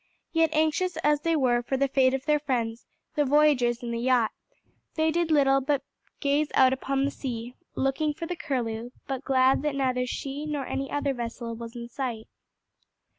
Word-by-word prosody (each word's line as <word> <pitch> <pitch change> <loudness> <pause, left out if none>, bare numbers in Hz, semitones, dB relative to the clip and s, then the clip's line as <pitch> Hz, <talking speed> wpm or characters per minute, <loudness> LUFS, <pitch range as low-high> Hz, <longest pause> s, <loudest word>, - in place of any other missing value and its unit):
Yet 325 -1 +3
anxious 315 +3 +1
as 295 0 +3
they 330 +1 +1
were 250 -5 +2
for 265 +2 -2
the 275 +1 +2
fate 265 -1 +3
of 270 +1 -5
their 300 0 +3
friends, 240 -5 -2 0.3
the 295 - +2
voyagers 270 -4 +3
in 235 - -3
the 235 - -2
yacht, 245 -2 +2 0.6
they 315 0 +2
did 340 0 0
little 275 -3 +4
but 275 0 0 0.4
gaze 290 +1 +2
out 260 -1 +6
upon 270 +1 0
the 285 - -1
sea, 240 -2 -5 0.2
looking 270 +3 +1
for 330 - -5
the 355 +2 -3
Curlew, 245 -7 -3 0.2
but 270 0 -4
glad 260 -1 +3
that 295 -1 -1
neither 255 -2 0
she 280 +4 -4
nor 290 -3 -2
any 275 +2 -3
other 285 -1 0
vessel 235 -1 -5
was 230 +1 -8
in 235 0 -6
sight. 235 -3 -4
270 Hz, 185 wpm, -27 LUFS, 245-295 Hz, 0.6 s, out